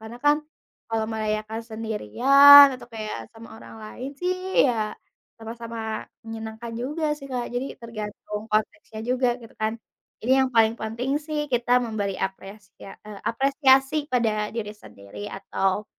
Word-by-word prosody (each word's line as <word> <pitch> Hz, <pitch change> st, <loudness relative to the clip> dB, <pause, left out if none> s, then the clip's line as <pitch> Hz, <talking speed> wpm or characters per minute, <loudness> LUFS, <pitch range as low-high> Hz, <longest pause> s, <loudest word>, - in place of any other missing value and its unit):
karena 220 Hz, +2 st, -9 dB
kan 295 Hz, 0 st, +5 dB, 0.5 s
kalau 225 Hz, -1 st, -1 dB
merayakan 215 Hz, +1 st, -2 dB
sendirian 260 Hz, -, +7 dB
atau 255 Hz, -, -11 dB
kayak 215 Hz, -1 st, -4 dB, 0.2 s
sama 225 Hz, 0 st, -13 dB
orang -, -, -12 dB
lain 255 Hz, +5 st, -7 dB
sih 365 Hz, +1 st, 0 dB, 0.3 s
ya 250 Hz, -, +3 dB, 0.6 s
sama-sama 230 Hz, 0 st, -8 dB, 0.5 s
menyenangkan 225 Hz, +1 st, -7 dB
juga 300 Hz, +5 st, -3 dB
sih 275 Hz, -, -10 dB
Kak. 245 Hz, -1 st, -2 dB
Jadi 255 Hz, +3 st, -1 dB
tergantung 210 Hz, -2 st, -6 dB
konteksnya 220 Hz, +1 st, -2 dB
juga 250 Hz, 0 st, +2 dB
gitu 225 Hz, -, -13 dB
kan. 220 Hz, 0 st, +1 dB, 0.5 s
Jadi 250 Hz, +4 st, 0 dB
yang 265 Hz, -1 st, +2 dB
paling 225 Hz, 0 st, +4 dB
penting 230 Hz, +4 st, -3 dB, 0.2 s
sih 305 Hz, -1 st, -3 dB
kita 240 Hz, 0 st, +1 dB
memberi 205 Hz, -4 st, -3 dB
apresia 195 Hz, 0 st, -13 dB
eee, 210 Hz, -2 st, -10 dB
apresiasi 270 Hz, +2 st, +3 dB, 0.2 s
pada 215 Hz, -3 st, +1 dB
diri 210 Hz, -2 st, -4 dB
sendiri 105 Hz, -, -11 dB
atau 195 Hz, +1 st, -2 dB
225 Hz, 140 wpm, -24 LUFS, 215-255 Hz, 0.6 s, sendirian